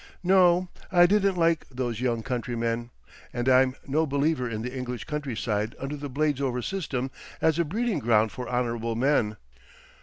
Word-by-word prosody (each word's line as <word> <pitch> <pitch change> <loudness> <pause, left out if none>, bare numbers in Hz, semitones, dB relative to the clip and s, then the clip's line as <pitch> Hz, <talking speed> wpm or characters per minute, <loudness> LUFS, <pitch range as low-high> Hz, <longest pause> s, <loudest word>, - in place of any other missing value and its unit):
No, 180 -1 +5 0.2
I 175 -2 +7
didn't 195 0 +2
like 165 -1 +2
those 125 -3 -3
young 120 -3 0
countrymen, 120 -1 -2 0.4
and 120 +1 -3
I'm 130 0 +5
no 155 +3 +1
believer 140 -2 0
in 110 -1 -4
the 125 +2 -5
English 125 -2 -4
countryside 115 -7 -2
under 135 +2 -4
the 145 0 -6
Bladesover 135 -3 0
system 135 -9 -3 0.3
as 160 0 +2
a 170 - +3
breeding 220 +7 -1
ground 110 -1 +3
for 125 +6 -6
honourable 115 -2 -1
men. 115 -4 +1
130 Hz, 155 wpm, -27 LUFS, 120-155 Hz, 0.4 s, I